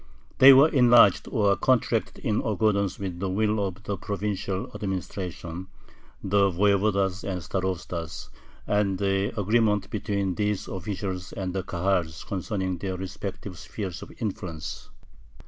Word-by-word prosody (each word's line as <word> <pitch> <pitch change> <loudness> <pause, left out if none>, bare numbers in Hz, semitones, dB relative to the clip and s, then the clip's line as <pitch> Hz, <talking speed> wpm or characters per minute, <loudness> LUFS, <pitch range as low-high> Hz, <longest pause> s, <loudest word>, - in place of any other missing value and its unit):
They 135 +1 +11
were 135 +3 +8
enlarged 120 -7 +6
or 100 -5 +2
contracted 115 +1 0
in 110 -4 +1
accordance 105 -3 +1
with 95 -3 -5
the 95 +1 -2
will 105 +2 +1
of 95 +2 -5
the 100 -1 -3
provincial 100 +3 -3
administration, 95 -2 -5 0.6
the 100 0 +3
voyevodas 100 0 +1
and 95 -2 -3
starostas, 85 -4 -4 0.4
and 100 -2 +1
the 95 +1 0
agreements 105 0 +2
between 100 -3 -2
these 105 0 -1
officials 95 -1 -5
and 95 -2 -4
the 95 - -1
Kahals 90 -3 -1
concerning 95 -1 -3
their 95 0 -3
respective 95 0 -6
spheres 95 -5 -6
of - - -10
influence. 85 -8 -5
100 Hz, 130 wpm, -26 LUFS, 95-105 Hz, 0.6 s, They